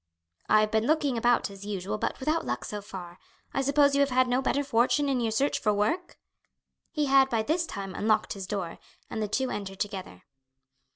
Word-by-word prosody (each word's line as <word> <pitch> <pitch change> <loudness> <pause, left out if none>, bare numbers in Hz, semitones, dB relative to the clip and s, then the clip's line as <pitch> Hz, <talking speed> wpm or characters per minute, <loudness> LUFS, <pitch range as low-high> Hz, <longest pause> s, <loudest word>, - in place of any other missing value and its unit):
"I 215 - +6
have 215 0 0
been 220 +1 +1
looking 295 -4 +2
about 235 -2 +2
as 195 0 -11
usual, 200 0 -3
but - - -2
without 310 +5 0
luck - - -3
so 210 -1 -5
far. 185 -3 -9 0.3
I 270 - +1
suppose 280 +1 +4
you 280 - +2
have 280 - +3
had 255 0 +3
no 250 +1 +1
better 280 +2 +1
fortune 270 +3 +2
in 265 -3 +1
your 230 - +1
search 265 +6 +1
for 210 - +2
work?" 320 - -1 0.7
He 300 -2 -1
had 270 -1 +5
by 225 -3 +1
this 330 +6 0
time 195 -2 -6
unlocked 215 +2 +1
his 195 -3 -7
door, 190 -4 -4 0.3
and 220 - -3
the 210 - 0
two 260 +5 -1
entered 195 -2 -5
together. 190 - -5
230 Hz, 210 wpm, -28 LUFS, 205-275 Hz, 0.7 s, I